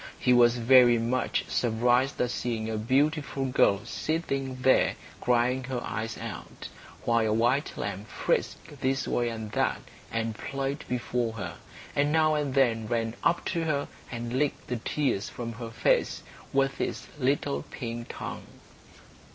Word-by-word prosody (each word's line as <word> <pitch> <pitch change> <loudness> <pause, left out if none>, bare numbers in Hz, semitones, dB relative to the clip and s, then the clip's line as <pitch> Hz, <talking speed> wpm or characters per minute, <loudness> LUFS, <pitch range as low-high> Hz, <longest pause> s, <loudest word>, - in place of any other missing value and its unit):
He 125 - +3
was 120 0 +5
very 120 0 +6
much 120 +3 0
surprised 120 +3 +2
at 125 - +1
seeing 110 -2 -2
a - - -2
beautiful 135 +5 +1
little 130 0 +4
girl 100 - -11
sitting 135 -5 -2
there, 130 - +4 0.2
crying 125 +1 +2
her 130 -1 -2
eyes 110 +2 -4
out, - - -7 0.4
while 115 -1 +3
a - - +1
white 120 +6 +2
lamb 100 0 -4
frisked 145 +5 -2
this 135 0 0
way 120 -1 +1
and 110 -2 -6
that, - - +1 0.3
and 115 0 -1
played 135 +5 -4
before 120 -1 -1
her, 90 -6 -6 0.4
and 145 +1 +2
now 155 0 +4
and 145 -3 -1
then 115 -5 +3
ran 115 0 -1
up 175 - +2
to 170 -2 -1
her 145 -3 0 0.2
and 120 0 -4
licked 145 +2 0
the 125 - -1
tears 120 -4 -1
from 115 -1 -5
her 115 +1 -6
face 115 +1 +1 0.3
with 135 0 +1
its - - -2
little 140 +1 +1
pink 120 -2 -5
tongue. - - -6
125 Hz, 155 wpm, -28 LUFS, 115-135 Hz, 0.4 s, very